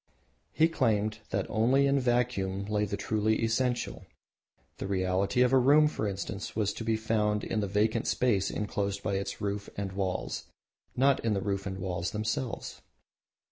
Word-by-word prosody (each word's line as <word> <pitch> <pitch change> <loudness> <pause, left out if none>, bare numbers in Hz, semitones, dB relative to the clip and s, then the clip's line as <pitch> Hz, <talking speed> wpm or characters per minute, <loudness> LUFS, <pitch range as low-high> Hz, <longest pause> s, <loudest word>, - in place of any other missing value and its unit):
He 160 - +4
claimed 110 -8 0
that - - -1
only 125 +6 +3
in 140 0 +3
vacuum 120 -6 0
lay 105 0 0
the 100 - -3
truly 110 +2 0
essential. 120 +2 -1 0.7
The - - -4
reality 95 +5 +1
of 125 +1 +2
a 135 - +7
room, 145 +4 +6
for 110 -8 -2
instance, 100 +1 -5
was 105 -2 0
to - - -6
be 110 -1 +1
found 105 -1 0
in 110 - -1
the 100 - -1
vacant 110 +3 +1
space 105 -7 +2
enclosed 100 -1 -2
by 100 - -1
the 95 0 -1
roof 100 0 -3
and 100 -1 -3
the - - -11
walls, 95 -2 -2 0.5
not 135 +1 +3
in 110 -2 +1
the - - 0
roof 100 0 -2
and 95 -1 -4
walls 90 -2 -2
themselves. 110 +3 -3
105 Hz, 175 wpm, -29 LUFS, 100-120 Hz, 0.7 s, a